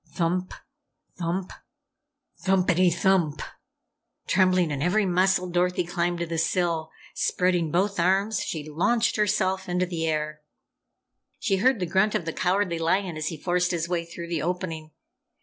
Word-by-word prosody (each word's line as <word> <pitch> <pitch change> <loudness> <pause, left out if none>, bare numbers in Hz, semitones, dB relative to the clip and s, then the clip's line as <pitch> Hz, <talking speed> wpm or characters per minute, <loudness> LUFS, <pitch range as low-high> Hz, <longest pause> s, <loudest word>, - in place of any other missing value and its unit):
Thump, 180 +1 -1 0.6
thump, 180 +2 -2 0.9
THUMPETY 185 -2 +3
THUMP! 175 -3 +1 0.8
Trembling 185 -3 +3
in 140 -1 -3
every 185 +6 +2
muscle, 185 0 +2
Dorothy 180 +1 +1
climbed 175 0 -1
to 170 - -2
the 165 -1 -3
sill. 165 -1 0 0.2
Spreading 180 -3 +1
both 190 +4 0
arms, 195 +4 +2
she 155 -2 -4
launched 200 +10 +1
herself 190 -2 0
into 180 +1 +1
the 165 -2 -3
air. 155 -1 -2 1.0
She 195 -3 0
heard 250 +3 +3
the 180 - -1
grunt 190 +5 +2
of 170 - -1
the 165 - -3
Cowardly 180 -2 0
Lion 175 +1 0
as 155 0 -3
he 160 - -4
forced 180 +3 0
his 170 -2 -1
way 175 -1 -1
through 170 0 -8
the 170 -3 -1
opening. 165 -2 -3
180 Hz, 150 wpm, -26 LUFS, 165-190 Hz, 1.0 s, THUMPETY